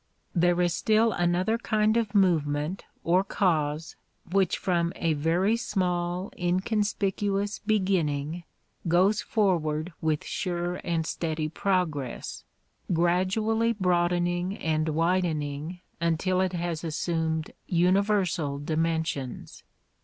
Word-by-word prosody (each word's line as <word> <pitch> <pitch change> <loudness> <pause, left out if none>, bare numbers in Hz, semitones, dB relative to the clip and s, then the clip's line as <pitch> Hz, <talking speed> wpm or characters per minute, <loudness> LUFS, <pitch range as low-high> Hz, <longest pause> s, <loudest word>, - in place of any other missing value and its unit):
There 175 0 +3
is 175 -1 +2
still 220 +5 +3
another 180 +5 +1
kind 215 -2 +2
of 220 -3 0
movement 160 -3 +1 0.2
or 180 +3 +3
cause 160 -5 0 0.4
which 190 -2 +2
from 170 -2 0
a 165 -2 0
very 170 +8 +2
small, 180 -4 -1
inconspicuous 200 +2 0
beginning 175 -7 0 0.4
goes 190 +6 +3
forward 170 -6 0
with 155 -2 0
sure 175 -5 -2
and 165 -2 -1
steady 155 -2 -2
progress, 165 -8 -2 0.5
gradually 190 +7 +2
broadening 175 -1 +1
and 155 0 0
widening 165 -1 -1 0.2
until 170 +3 +1
it 185 -1 0
has 170 -2 -3
assumed 160 -1 -1 0.2
universal 180 -4 +2
dimensions. 160 -3 -2
175 Hz, 100 wpm, -27 LUFS, 160-195 Hz, 0.5 s, There